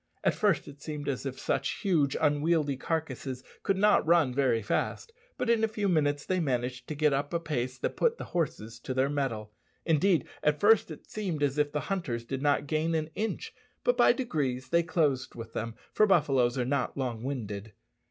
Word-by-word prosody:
At - - +3
first 205 -6 +1
it 145 0 -12
seemed 150 -1 -5
as 140 0 -2
if 130 - -5
such - - -1
huge, 155 -8 +2
unwieldy 150 -1 +2
carcasses 135 -3 -3 0.2
could 195 - +1
not 210 +1 +4
run 160 -5 +3
very 130 -5 +2
fast; 450 - -2 0.2
but 250 - -2
in 230 -1 +3
a - - +4
few 210 -2 -2
minutes 145 -5 +1
they 185 -1 0
managed 125 -4 -2
to 155 - -4
get 150 -1 +3
up 145 +4 -1
a - - +2
pace 130 -6 -3
that - - -2
put 470 -1 +2
the - - -6
horses 125 -10 -2
to 130 - -5
their 135 +2 +2
mettle. 115 -7 -2 0.3
Indeed, 165 -1 +3 0.2
at 150 0 +2
first 215 -1 +5
it 155 - -9
seemed 180 -9 -3
as 145 +1 +1
if 145 0 +2
the 150 - -1
hunters 145 -12 -3
did 135 +2 -4
not 145 0 +2
gain 155 +3 0
an 155 0 -2
inch; 220 +1 -3 0.3
but - - +3
by - - +6
degrees 135 - -2
they 170 +3 +4
closed 150 -6 0
with 115 -1 -8
them, 115 0 -4 0.2
for 215 - +4
buffaloes 135 -9 +3
are 125 - 0
not 135 +1 -1
long 125 -4 -2
winded. 110 -5 -5
145 Hz, 200 wpm, -29 LUFS, 130-170 Hz, 0.3 s, by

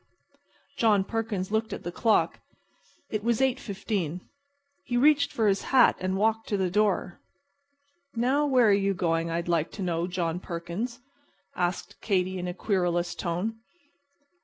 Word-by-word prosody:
John 210 -4 +4
Perkins 210 -3 -3
looked 220 +1 0
at - - -7
the 175 - -4
clock. 220 +4 +1 0.7
It 215 -1 -2
was 235 -1 +1
8.15. 200 - -1 0.6
He 245 - -1
reached 285 +2 +4
for 220 -2 +1
his 195 -1 +2
hat 260 -3 +5
and 185 +1 -1
walked 220 +2 +1
to 205 - +1
the 185 -2 0
door. 205 -3 +1 1.0
"Now, 265 +6 +2
where 255 -4 +4
are - - +6
you 200 0 +1
going, 165 -2 0
I'd 170 +1 -2
like 165 -2 +1
to 200 - -5
know, 170 -1 -1
John 175 -2 -2
Perkins?" 185 +9 -5 0.5
asked 175 0 -3
Katy, 185 -2 0
in 180 - -4
a 180 - -3
querulous 175 -4 0
tone. 190 +6 -3
195 Hz, 150 wpm, -27 LUFS, 175-225 Hz, 1.0 s, are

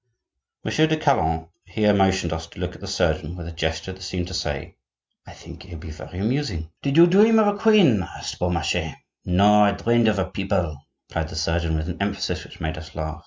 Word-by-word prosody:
Monsieur 155 +1 +3
de 155 0 +1
Calonne 80 - +1 0.2
here 105 +2 +1
motioned 95 -4 +2
us 80 0 -5
to - - -14
look - - -3
at - - -14
the - - -7
surgeon, 80 +4 -1
with 85 -1 -7
a - - -6
gesture 80 +2 -3
that 95 - -14
seemed 90 -1 -4
to - - -7
say: 75 -6 -4 0.5
"I - - -11
think 85 0 -12
he'll 90 -3 -10
be 80 0 -9
very 80 +3 -10
amusing." 100 - -2
"Did 140 +2 0
you 170 - +9
dream 210 +6 +5
of 220 - +5
a 205 - -9
queen?" 200 - +5
asked 90 - -7
Beaumarchais. 90 -2 -1 0.3
"No, 105 +3 +5
I 100 -1 +3
dreamed 115 +3 +2
of 105 -1 +2
a 95 - +1
People," 90 -6 -2 0.3
replied 80 -2 -3
the - - -8
surgeon, 80 0 0
with 80 +1 -3
an 90 +2 -5
emphasis 100 0 -2
which - - -14
made 80 -1 -3
us 80 0 -12
laugh. 80 0 -4
90 Hz, 215 wpm, -23 LUFS, 80-105 Hz, 0.5 s, you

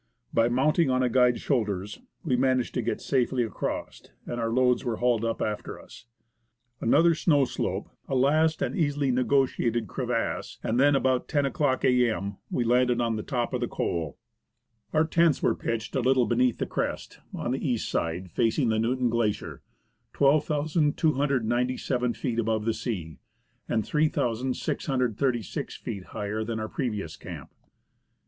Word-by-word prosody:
By 115 0 +3
mounting 145 +5 +2
on 130 0 +2
a 125 - +2
guide's 125 0 +3
shoulders, 105 -7 -1 0.2
we 140 -8 +1
managed 130 0 +1
to 125 - 0
get 115 - -2
safely 130 -2 +1
across, 110 - -4 0.2
and 120 0 -4
our 115 - 0
loads 125 +1 +2
were 120 -3 -1
hauled 120 -1 +1
up 115 0 -1
after 105 -1 -4
us. 115 - -14 0.7
Another 165 +8 +4
snow 150 -3 +3
slope, - - -3 0.2
a 135 - -1
last 155 +5 +3
and - - -2
easily 145 -6 +1
negotiated 125 -3 +1
crevasse, 125 -3 -2
and 115 +2 0
then, 145 +1 +5
at - - +2
about 130 -1 0
lo 145 -3 +3
o'clock 140 -1 0
a.m., 115 -6 +1
we 120 - 0
landed 125 +1 +3
on 115 -2 +1
the 110 - -3
top 120 0 -2
of 125 - -1
the 120 - 0
col. 80 -9 -3 0.7
Our 155 +1 +3
tents 165 -2 +2
were - - +4
pitched 115 +1 -4
a - - +2
little 130 0 +3
beneath 120 +2 +2
the - - -1
crest, - - -4
on 120 - -3
the 130 - -2
east 125 -6 -1
side, 85 +2 -2
facing 115 - +1
the 110 0 +1
Newton 125 +1 +1
Glacier, 115 -3 -1 0.5
12,297 140 -5 +1
feet 120 -4 -2
above 110 -1 0
the 115 - +1
sea, 85 - -5 0.5
and 110 -3 0
3,636 125 - -1
feet 95 -3 -6
higher 105 +2 -3
than 110 0 -3
our 110 0 -4
previous 105 - -3
camp. - - -9
H.R. - - -40
125 Hz, 160 wpm, -27 LUFS, 115-135 Hz, 0.7 s, then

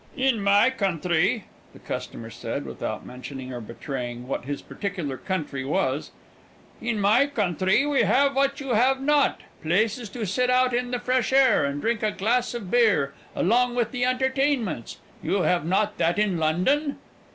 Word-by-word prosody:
"In 260 -4 +2
my 205 +5 +4
country," 190 -1 0 0.3
the - - -14
customer 115 0 -6
said, - - -5
without - - -5
mentioning 130 +1 -8
or 120 - -5
betraying 120 +1 -6
what 130 - -3
his 145 0 -3
particular 180 -9 -4
country 150 -4 -3
was 135 0 -1 0.7
"in 230 -2 -1
my 220 +8 +4
country 195 - +1
we 290 -2 +2
have 280 +1 +3
what 275 0 +1
you 275 -2 -6
have 255 +3 +3
not, 290 +1 +2 0.2
places 215 +7 0
to 225 +2 -4
sit 250 +7 0
out 255 0 +3
in 245 +1 0
the 245 - -1
fresh 250 0 0
air, 265 - +5
and 140 +1 -3
drink 230 -1 0
a 215 - +2
glass 240 +5 0
of 205 -6 -6
beer, 210 -13 +3 0.2
along 240 +6 +2
with 235 -2 0
the 245 -1 -2
entertainments. 255 - 0 0.2
You 195 -2 0
have 175 -4 +1
not 205 +3 0
that 170 +1 +2
in 205 -5 +1
London?" 185 - +1
215 Hz, 165 wpm, -25 LUFS, 165-255 Hz, 0.7 s, air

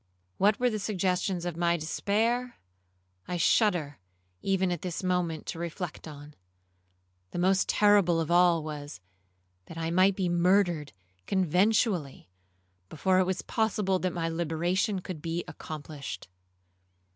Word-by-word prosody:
What 205 +2 +3
were 250 0 +2
the 215 - -2
suggestions 185 -2 -1
of 175 -2 -3
my 170 0 +1
despair, 225 +9 -1 0.7
I 180 - -2
shudder 170 - +2 0.4
even 190 -2 +1
at 175 - -3
this 180 0 -4
moment 180 -4 -1
to 165 - -5
reflect 170 0 -5
on. 145 -1 -11 1.0
The - - -7
most 185 +2 +2
terrible 205 -5 +4
of 165 0 -2
all 175 -2 +4
was, 145 - -7 0.7
that 165 - -10
I 165 0 -2
might 185 +2 +4
be 185 -2 -1
murdered 175 -3 +2 0.4
conventually 185 - +1 0.6
before 185 +4 +1
it 185 - +3
was 185 0 -2
possible 210 -4 0
that 185 0 -1
my 165 -1 -2
liberation 175 +4 -1
could 180 -5 -7
be 165 +2 -3
accomplished. 145 - -7
180 Hz, 135 wpm, -28 LUFS, 165-195 Hz, 1.0 s, terrible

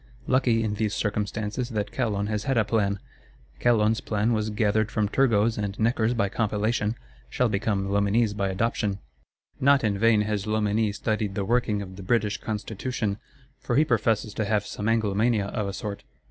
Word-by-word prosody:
Lucky, 125 -3 +2
in 110 -2 -1
these 105 0 -1
circumstances, 105 +3 -2
that 105 -4 -3
Calonne 105 -5 -1
has 105 0 -2
had 135 -2 +1
a 110 - +3
plan! 100 -2 +1 0.6
Calonne's 115 -1 +3
plan 110 0 0
was 110 -1 0
gathered 105 0 +1
from 105 -3 0
Turgot's 115 -2 +2
and 100 -1 -3
Necker's 115 +1 +2
by 100 -3 +1
compilation; 105 +1 0 0.3
shall 125 - +1
become 100 -1 0
Loménie's 100 +2 +2
by 100 -1 -1
adoption. 105 0 -1 0.6
Not 140 0 +4
in 100 -3 0
vain 115 -1 +4
has 105 -2 -2
Loménie 105 0 +1
studied 105 -2 -1
the 100 - -1
working 110 -2 +1
of 95 -1 -10
the - - -7
British 105 +1 0
Constitution; 110 0 -3 0.4
for 120 - -2
he 155 - +5
professes 110 -4 +1
to 110 - -1
have 105 0 +1
some 105 - -4
Anglomania, 110 0 +2
of 105 -4 -1
a - - -2
sort. 100 0 -5
105 Hz, 175 wpm, -26 LUFS, 100-115 Hz, 0.6 s, he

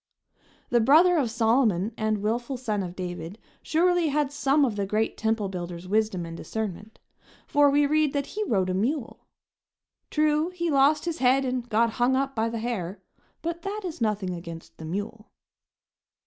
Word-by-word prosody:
The 240 - +4
brother 325 +9 +5
of 265 -7 +1
Solomon 225 -4 +2
and 215 -1 -1
willful 240 +5 -1
son 215 -5 -2
of 180 -1 -6
David 175 0 -6 0.2
surely 350 +1 +2
had 290 -1 0
some 285 0 +2
of 230 -5 -2
the 200 -1 -2
great 215 +2 0
temple 220 -2 0
builder's 175 -1 -6
wisdom 210 -3 0
and 165 0 -7
discernment, 215 +2 -5 0.5
for 290 0 +4
we 290 +1 +3
read 305 0 +2
that 280 -1 -1
he 430 - -1
rode 190 - +1
a - - -1
mule. 235 +7 -2 0.8
True, 305 +1 +2
he 345 -2 -2
lost 285 +3 +3
his 335 -1 -3
head 265 +1 +3
and 250 -1 -3
got 230 +1 +2
hung 255 +2 +4
up 270 0 -1
by 225 0 0
the 230 - -4
hair, 215 -5 -4 0.4
but 335 +1 -3
that 405 +2 -4
is 340 -6 -6
nothing 210 -4 0
against 170 -1 -9
the 160 - -7
mule. 205 +6 -5
230 Hz, 175 wpm, -26 LUFS, 205-290 Hz, 0.8 s, brother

